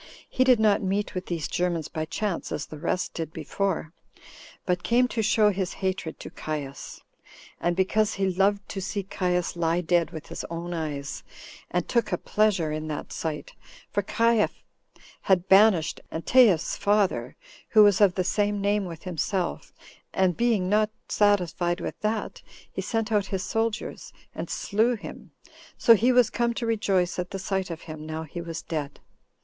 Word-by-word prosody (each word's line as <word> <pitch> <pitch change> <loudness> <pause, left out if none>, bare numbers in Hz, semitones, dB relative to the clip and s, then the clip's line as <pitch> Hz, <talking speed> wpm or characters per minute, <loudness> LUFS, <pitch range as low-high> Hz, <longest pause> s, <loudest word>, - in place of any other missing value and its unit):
He 255 - +3
did 255 -3 +5
not 215 -1 +4
meet 200 +2 -1
with 185 -1 -5
these 170 -3 -2
Germans 175 -3 -1
by 155 0 -4
chance, 195 +3 -3
as 150 0 -3
the 155 - -10
rest 180 +3 -1
did 160 -2 -4
before, 185 -3 -2 0.7
but 180 -1 0
came 245 +5 +3
to 230 - -1
show 215 0 +4
his 190 -1 -2
hatred 190 -4 -3
to - - -8
Caius, 145 -3 -6 0.6
and 175 0 0
because 210 +4 +1
he 195 - 0
loved 195 +2 +1
to 195 - -4
see 195 +1 -3
Caius 180 -2 -1
lie 170 0 +1
dead 175 -1 +2
with 160 -3 -9
his - - -5
own 170 +1 -4
eyes, 150 -4 -4 0.5
and 180 -1 -1
took 235 -4 +1
a 180 - +1
pleasure 200 -8 +1
in 155 0 -3
that 150 -1 -5
sight; 155 -2 -4 0.4
for 205 - +1
Caius 230 +2 +2 0.7
had 185 -1 +2
banished 195 -4 +5
Anteius's 190 0 +4
father, 200 - +1 0.3
who 215 -1 +7
was 205 -1 +5
of 195 -3 +5
the 185 - +1
same 205 +2 0
name 200 0 +1
with 165 -2 -8
himself, 180 +1 -2 0.4
and 185 -2 +2
being 230 -6 +1
not 210 +2 +3 0.2
satisfied 180 -4 +2
with - - -5
that, 220 - -2 0.3
he - - -4
sent 225 -1 -2
out 205 -2 +2
his 190 -1 -2
soldiers, 225 0 -2 0.2
and - - -5
slew 225 +4 +1
him; 205 - -10 0.5
so 230 - +7
he 230 +4 +4
was 250 -3 +4
come 235 +1 0
to 235 - -2
rejoice 195 -6 +1
at 180 0 -3
the 195 - -4
sight 190 -1 -2
of 165 -1 -6
him, 155 -1 -8
now 160 0 -4
he 170 +3 -7
was 165 -1 -6
dead. 150 -3 -4
190 Hz, 175 wpm, -26 LUFS, 170-210 Hz, 0.7 s, who